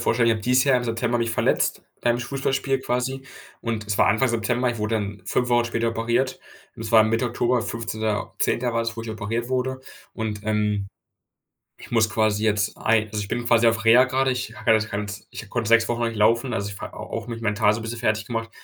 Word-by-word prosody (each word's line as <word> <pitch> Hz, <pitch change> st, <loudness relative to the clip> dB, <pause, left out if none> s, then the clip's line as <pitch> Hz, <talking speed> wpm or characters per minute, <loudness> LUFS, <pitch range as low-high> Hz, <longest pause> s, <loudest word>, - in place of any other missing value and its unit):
vorstellen, 120 Hz, 0 st, +2 dB
ich -, -, +5 dB
habe 110 Hz, -, -5 dB
dieses 125 Hz, +3 st, +3 dB
Jahr 135 Hz, -2 st, +4 dB
im 125 Hz, -, -1 dB
September 120 Hz, +1 st, 0 dB
mich 115 Hz, 0 st, 0 dB
verletzt, 115 Hz, -, +1 dB, 0.2 s
beim 120 Hz, 0 st, +1 dB
Fußballspiel 135 Hz, +1 st, -1 dB
quasi, 130 Hz, +1 st, -2 dB, 0.4 s
und 115 Hz, -2 st, -3 dB
es 105 Hz, -1 st, -2 dB
war -, -, +5 dB
Anfang 115 Hz, +5 st, +3 dB
September 120 Hz, +2 st, 0 dB
ich 115 Hz, -, -5 dB
wurde 105 Hz, +1 st, -1 dB
dann 100 Hz, -2 st, -4 dB
5 125 Hz, +5 st, 0 dB
Wochen 120 Hz, -1 st, +3 dB
später 115 Hz, -1 st, -1 dB
operiert 120 Hz, +3 st, 0 dB, 0.4 s
und -, -, -7 dB
es 110 Hz, -, -5 dB
war 110 Hz, -1 st, +8 dB
Mitte 115 Hz, +3 st, +1 dB
Oktober 120 Hz, +1 st, +1 dB
15.10. 110 Hz, +2 st, -2 dB
war 115 Hz, -, +1 dB
das, 115 Hz, 0 st, -4 dB
wo 115 Hz, -, -5 dB
ich 115 Hz, -, -6 dB
operiert 110 Hz, +2 st, -3 dB
wurde, 130 Hz, 0 st, -1 dB, 0.3 s
und, 110 Hz, -2 st, -3 dB
ähm, 105 Hz, -2 st, 0 dB, 1.0 s
ich -, -, -13 dB
muss 115 Hz, -2 st, +3 dB
quasi 110 Hz, -1 st, +1 dB
jetzt 105 Hz, -1 st, +1 dB
ein 110 Hz, -1 st, +2 dB
also 105 Hz, 0 st, -4 dB
ich 100 Hz, -, -7 dB
bin 120 Hz, 0 st, -2 dB
quasi 120 Hz, -1 st, +4 dB
auf 115 Hz, -1 st, +2 dB
Reha 120 Hz, +3 st, +7 dB
grade. 130 Hz, 0 st, +1 dB
Ich 120 Hz, -3 st, -3 dB
habe 115 Hz, -, 0 dB
ja -, -, +7 dB
das 110 Hz, 0 st, +1 dB
ganz 105 Hz, 0 st, -5 dB
ich 110 Hz, -, -9 dB
konnte 115 Hz, -2 st, -2 dB
6 115 Hz, 0 st, +5 dB
Wochen 120 Hz, 0 st, -2 dB
lang 115 Hz, -, +1 dB
nicht 115 Hz, -, -7 dB
laufen, 115 Hz, +4 st, +3 dB
also, 100 Hz, -2 st, -2 dB
ich 100 Hz, -, -9 dB
war -, -, -7 dB
au -, -, -8 dB
auch 115 Hz, -, -6 dB
mich 115 Hz, -1 st, -6 dB
mental 105 Hz, -1 st, +2 dB
so 115 Hz, -, -4 dB
bisschen 115 Hz, +1 st, -5 dB
fertiggemacht, 115 Hz, 0 st, -1 dB
115 Hz, 230 wpm, -24 LUFS, 110-120 Hz, 1.0 s, war